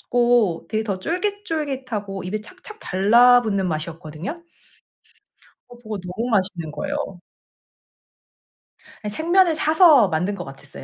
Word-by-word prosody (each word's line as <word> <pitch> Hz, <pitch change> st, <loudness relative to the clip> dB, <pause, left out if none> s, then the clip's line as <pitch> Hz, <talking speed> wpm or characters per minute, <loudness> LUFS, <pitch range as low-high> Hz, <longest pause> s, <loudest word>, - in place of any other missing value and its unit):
같고 240 Hz, -7 st, +1 dB
되게 220 Hz, 0 st, -1 dB
더 195 Hz, -3 st, -3 dB
쫄깃쫄깃하고 285 Hz, -, -3 dB
입에 210 Hz, +4 st, -3 dB
착착 375 Hz, -, -12 dB
달라붙는 215 Hz, 0 st, +4 dB
맛이었거든요. 160 Hz, -, -6 dB, 1.3 s
어 245 Hz, -, -12 dB
그거 215 Hz, -3 st, -6 dB
너무 185 Hz, +7 st, -4 dB
맛있는 185 Hz, -6 st, -1 dB
거예요. 290 Hz, -, -4 dB, 2.1 s
생면을 335 Hz, -, +2 dB
사서 310 Hz, -, +5 dB
만든 180 Hz, +5 st, -1 dB
것 175 Hz, -, -6 dB
같았어요. 135 Hz, 0 st, -11 dB
220 Hz, 265 characters per minute, -22 LUFS, 185-295 Hz, 2.1 s, 사서